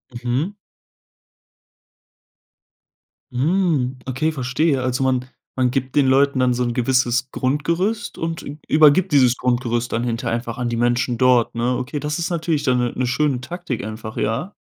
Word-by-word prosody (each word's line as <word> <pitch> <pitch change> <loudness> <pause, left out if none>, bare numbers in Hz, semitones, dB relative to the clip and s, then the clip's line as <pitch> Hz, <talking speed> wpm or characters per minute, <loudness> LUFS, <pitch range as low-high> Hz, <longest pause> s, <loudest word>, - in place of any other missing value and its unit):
Mhm. 125 +9 -1 2.8
Mhm, 140 -2 +1
okay, 135 +5 0
verstehe. 135 +1 0
Also, 130 +1 -1
man 130 -1 +1 0.3
man 125 -1 +1
gibt 130 -1 -3
den 140 - +4
Leuten 135 +1 +3
dann 125 -1 +3
so 125 +1 -1
'n 120 -1 -1
gewisses 125 0 +1
Grundgerüst 170 - -1
und 165 0 -3
ü 145 - -8
übergibt 155 +4 +5
dieses 130 -3 +5
Grundgerüst 120 -2 -1
dann 115 - -1
hinterher 115 -1 -2
einfach 115 -1 -6
an 125 -1 -2
die 120 - -2
Menschen 120 +1 +1
dort, 125 -1 +3
ne? 120 +2 0
Okay, 145 +4 -4
das 150 +1 -3
ist 170 - -2
natürlich 165 -3 -1
dann 130 -3 +2
'ne 120 -1 -1
'ne 125 - 0
schöne 135 0 0
Taktik 170 - -5
einfach, 110 +1 -7
ja? 115 - -2
130 Hz, 160 wpm, -21 LUFS, 120-150 Hz, 2.8 s, übergibt